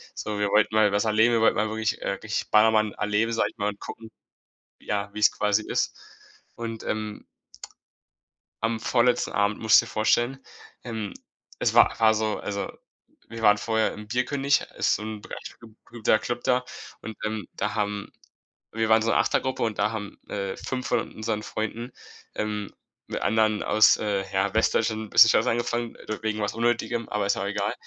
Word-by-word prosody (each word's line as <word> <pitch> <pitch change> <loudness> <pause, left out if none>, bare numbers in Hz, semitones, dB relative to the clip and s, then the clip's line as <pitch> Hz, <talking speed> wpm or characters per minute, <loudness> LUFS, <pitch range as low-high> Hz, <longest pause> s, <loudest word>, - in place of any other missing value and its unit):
So, 105 -1 -4
wir 105 - +1
wollten 110 +1 +3
mal 110 -1 +4
was 100 - +2
erleben, 110 +2 +3
wir 115 - +2
wollten 115 - +4
mal 110 +1 +1
wirklich, 110 0 -2
äh, - - -1
richtig 110 +2 -4
Ballermann 110 -1 +4
erleben, 105 +2 0
sage 115 - +1
ich - - -36
mal, 105 -1 -1
und 100 - -8
gucken, 115 0 -9 0.7
ja, 100 -1 -3
wie's 105 0 +4
quasi 105 +1 +1
ist. - - -1 0.6
Und 115 -1 -6
ähm 110 -1 -4 1.4
am 115 0 0
vorletzten 120 +2 +2
Abend 100 +1 +1
musst 110 0 +6
du - - -9
dir - - -11
vorstellen, 120 +4 +1 0.5
ähm, 110 -4 -5 0.5
es - - +1
wa - - +6
war 110 -1 +5
so 110 0 -1
also, 100 -1 -4 0.6
wir 115 0 -7
waren 105 -2 +5
vorher 110 +1 0
im 105 0 -10
Bierkönig, 135 +4 +1 0.2
ist, - - +2
ähm, 110 0 -6
be - - -14 0.6
guter 110 -2 +1
Club 120 0 -4
da 125 0 +2 0.4
und, 110 0 -7
ähm, 110 -1 -3
da 105 - -3
haben 105 -1 -2 0.6
wir 110 0 -1
waren 110 0 +5
so 115 - 0
'ne - - +3
8er- - - +2
Gruppe, 130 0 -2
und 110 -2 -2
da 105 +1 +2
haben, 105 -3 -6
äh, 100 -1 -3
5 130 -1 -5
von 120 -2 -1
unseren 110 -1 -2
Freunden, 115 +4 -4 0.4
ähm, 105 -1 -3 0.4
mit - - -4
anderen 110 -1 +2
aus, 110 0 +5
äh, 100 -2 -1
ja, 95 +1 0
Westdeutschland 110 -1 +1
bisschen 110 +2 +8
Stress 110 +2 +3
angefangen, 120 0 -1 0.3
wegen 110 0 -2
was 105 -1 -1
Unnötigem, 120 0 -1
aber 105 -1 -1
ist 100 - +2
auch - - -2
egal. 100 +2 -1
110 Hz, 180 wpm, -25 LUFS, 105-115 Hz, 1.4 s, bisschen